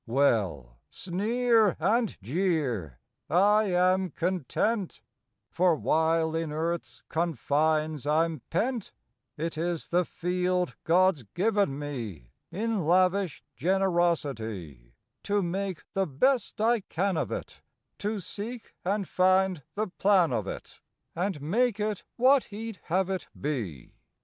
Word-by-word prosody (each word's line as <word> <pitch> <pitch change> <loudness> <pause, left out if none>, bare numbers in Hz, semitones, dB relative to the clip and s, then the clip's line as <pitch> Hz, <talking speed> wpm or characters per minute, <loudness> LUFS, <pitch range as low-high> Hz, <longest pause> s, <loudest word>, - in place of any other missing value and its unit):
Well, 100 - +1
sneer 220 +3 +1
and 220 +6 +1
jeer 130 - -1 0.3
I 205 +6 +4
am 185 0 +2
content, 185 - -1 0.5
For 175 0 +3
while 160 +1 +1
in 165 -2 -2
Earth 165 +2 -1
s - - -16
confines 155 -1 0
I 155 +2 +4
m 160 -5 -5
pent 230 +5 -1 0.4
It 160 0 -3
is 170 -1 -2
the 180 +1 +3
field 180 +1 -1
God 185 +1 +4
s - - -13
given 200 -6 +1
me 115 - -6 0.2
In 220 -1 -1
lavish 185 +1 +2
generosity, 135 - -1 0.3
To 205 -1 0
make 185 0 -3
the 195 -1 +1
best 225 - +1
I 230 +2 +3
can 190 0 -1
of - - -1
it, - - -6 0.4
To 210 +1 -2
seek 215 +6 -7
and 195 +1 -1
find 185 -2 +3
the 215 +1 0
plan 185 -5 +3
of 110 -4 -1
it, - - -8 0.3
And 180 -1 -1
make 220 +7 +1
it 210 -1 -2
what 260 +2 +5
He 225 +2 -6
d 195 - -15
have 190 +2 +1
it 190 - -3
be. 110 - -4
180 Hz, 130 wpm, -28 LUFS, 150-200 Hz, 0.5 s, what